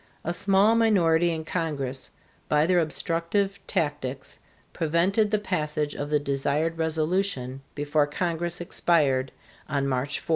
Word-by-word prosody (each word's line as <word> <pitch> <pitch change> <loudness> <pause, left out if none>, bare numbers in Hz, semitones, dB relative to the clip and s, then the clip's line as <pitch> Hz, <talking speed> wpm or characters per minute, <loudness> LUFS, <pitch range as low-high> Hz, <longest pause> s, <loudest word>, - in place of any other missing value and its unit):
A 170 - -2
small 200 +4 +3
minority 175 -7 +3
in 160 -1 -3
Congress 140 -6 -3 0.4
by 150 0 +3
their 180 +1 +3
obstructive 170 +5 0
tactics 145 -6 -3 0.3
prevented 180 +6 +1
the 215 - +2
passage 155 -7 -2
of 145 0 -4
the 150 - +3
desired 145 +4 -1
resolution 160 -4 -1
before 145 0 +1
Congress 170 +2 -2
expired 145 -7 +1 0.4
on 140 -1 0
March 135 +2 -1
4. - - -19
160 Hz, 125 wpm, -26 LUFS, 145-175 Hz, 0.4 s, small